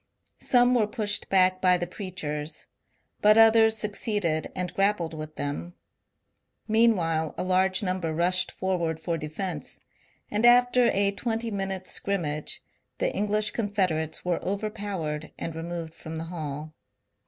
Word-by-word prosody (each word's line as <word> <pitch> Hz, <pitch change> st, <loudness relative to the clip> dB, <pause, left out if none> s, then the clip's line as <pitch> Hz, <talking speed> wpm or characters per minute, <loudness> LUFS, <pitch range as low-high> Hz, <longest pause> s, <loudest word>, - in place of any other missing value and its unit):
Some 245 Hz, 0 st, +4 dB
were 225 Hz, -4 st, +3 dB
pushed 210 Hz, -1 st, -1 dB
back 185 Hz, -1 st, +3 dB
by 180 Hz, -1 st, +5 dB
the 175 Hz, -, -2 dB
preachers, 160 Hz, -5 st, -5 dB, 0.6 s
but 210 Hz, +1 st, +6 dB
others 225 Hz, 0 st, +6 dB
succeeded 205 Hz, -6 st, -1 dB
and 180 Hz, -2 st, -3 dB
grappled 195 Hz, -4 st, +1 dB
with 155 Hz, 0 st, -7 dB
them. 145 Hz, +5 st, -4 dB, 0.9 s
Meanwhile 180 Hz, -9 st, +2 dB
a -, -, -1 dB
large 185 Hz, +2 st, +2 dB
number 185 Hz, -3 st, -1 dB
rushed 180 Hz, +3 st, +2 dB
forward 170 Hz, -4 st, -2 dB
for 170 Hz, 0 st, -2 dB
defence, 165 Hz, +4 st, -4 dB, 0.5 s
and 210 Hz, +2 st, 0 dB
after 245 Hz, +1 st, +6 dB
a 200 Hz, 0 st, +2 dB
twenty 225 Hz, +2 st, -3 dB
min 195 Hz, -1 st, -2 dB
utes' 190 Hz, -1 st, -3 dB
scrimmage 155 Hz, -7 st, -1 dB, 0.3 s
the -, -, -1 dB
English 210 Hz, +1 st, 0 dB
Confederates 185 Hz, -9 st, -1 dB
were 180 Hz, -1 st, -1 dB
overpowered 195 Hz, -7 st, -3 dB
and 165 Hz, -, -5 dB
removed 165 Hz, 0 st, -5 dB
from 160 Hz, 0 st, -8 dB
the 160 Hz, -, -4 dB
hall. 155 Hz, -1 st, -5 dB
185 Hz, 135 wpm, -27 LUFS, 165-210 Hz, 0.9 s, but